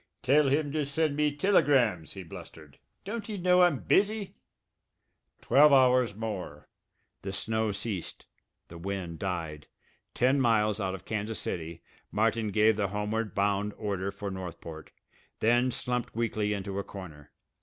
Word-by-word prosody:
"Tell 140 +3 +4
him 145 +1 +1
to 155 0 0
send 145 +1 0
me 150 0 +2
tilegrams!" 135 - +2
he 95 - -7
blustered. 80 -5 -12 0.3
"Don't 210 +1 -5
he 215 -2 -4
know 180 0 +4
I'm 175 -5 +4
busy?" 205 - +1 1.1
Twelve 150 +2 +6
hours 125 -5 +4
more. 100 -9 -6 0.5
The 95 - -5
snow 110 +2 -1
ceased. 100 -3 -4 0.4
The 85 - -10
wind 90 -2 -4
died. 80 -6 -4 0.5
Ten 130 +3 +3
miles 110 -3 +2
out 95 -1 -1
of 95 - -12
Kansas 110 0 -3
City 85 0 -5 0.3
Martin 110 +1 +1
gave 105 +1 +3
the 100 -2 +1
homeward 105 +1 -2
bound 100 +1 +1
order 100 -2 -2
for 100 -1 -6
Northport, 85 -4 -8 0.5
then 120 +3 +3
slumped 125 -2 -2
weakly 110 -2 0
into 100 -1 -3
a - - -2
corner. 80 -9 -10
105 Hz, 145 wpm, -29 LUFS, 95-130 Hz, 1.1 s, Twelve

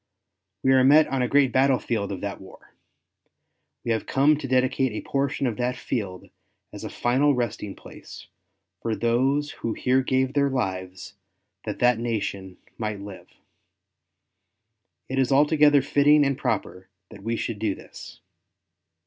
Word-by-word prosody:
We 130 - +3
are 130 -1 +5
met 150 +4 +6
on 135 -1 -1
a 125 - +1
great 140 -1 +3
battle 130 +1 +3
field 105 -5 -3
of 95 - -5
that 100 -1 -5
war. 95 - -16 1.1
We 120 - -2
have 110 - -1
come 145 +3 +3
to 140 - -6
dedicate 130 0 +1
a - - -6
portion 140 0 -1
of 120 -4 -2
that 125 0 -1
field 95 -7 -5 0.4
as - - -8
a - - -5
final 135 +4 +1
resting 110 -4 -3
place - - -12 0.6
for 115 -1 -2
those 135 +6 +1
who 115 - -4
here 130 +1 +1
gave 130 0 0
their 140 -1 +2
lives 95 -7 -4 0.5
that - - -4
that 125 -2 +3
nation 100 -5 -4 0.2
might 105 -2 -3
live. 100 -1 -10 1.8
It 135 +1 -2
is 130 0 +1
altogether 145 0 +4
fitting 145 +1 +4
and 140 0 0
proper 95 -6 -3 0.2
that 105 -3 -12
we 115 +3 -2
should 115 -2 -4
do 105 -3 -1
this. - - -13
125 Hz, 155 wpm, -24 LUFS, 110-135 Hz, 1.8 s, met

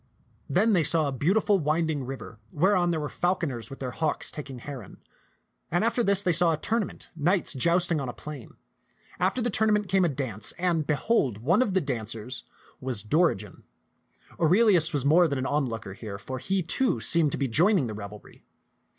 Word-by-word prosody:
Then 210 +10 +3
they 175 -4 +3
saw 155 0 +3
a - - -2
beautiful 195 - +2
winding 155 -1 0
river 130 -4 -8
whereon 180 +2 +2
were 155 -3 -1
fal 175 +5 0
coners 125 - -5
with 135 - -9
their 130 -2 -5
hawks 160 +2 -1
taking 135 -3 -7
heron. 125 -4 -9 0.7
And 175 +4 +1
after 235 +1 +1
this 200 -1 +2
they 180 - +2
saw 165 0 +3
a - - -2
tournament, 220 +5 -3
knights 175 +4 +1
jousting 170 +3 +2
on 130 - -4
a - - -5
plain. 145 -5 -10 0.6
After 195 +7 0
the 240 - 0
tournament 210 -1 +2
came 190 0 +3
a 175 - +2
dance, 125 -8 -4
and 170 -4 -1
behold, 150 - +1
one 160 - +2
of 205 -7 0
the 190 - +3
dancers 120 -2 -5 0.3
was 125 -6 -3
Dorigen. 110 - 0 0.8
Aurelius 175 -1 +4
was 145 -4 +1
more 170 +4 +5
than 140 -3 -2
an 130 - -2
onlooker 120 -9 -2
here, 100 -1 -7
for 130 +6 -6
he, 190 +6 -1
too, 245 +10 0
seemed 165 -4 +3
to - - -2
be 135 - 0
joining 170 - +3
the 110 - -5
revelry. 105 0 -10
155 Hz, 185 wpm, -26 LUFS, 130-185 Hz, 0.8 s, more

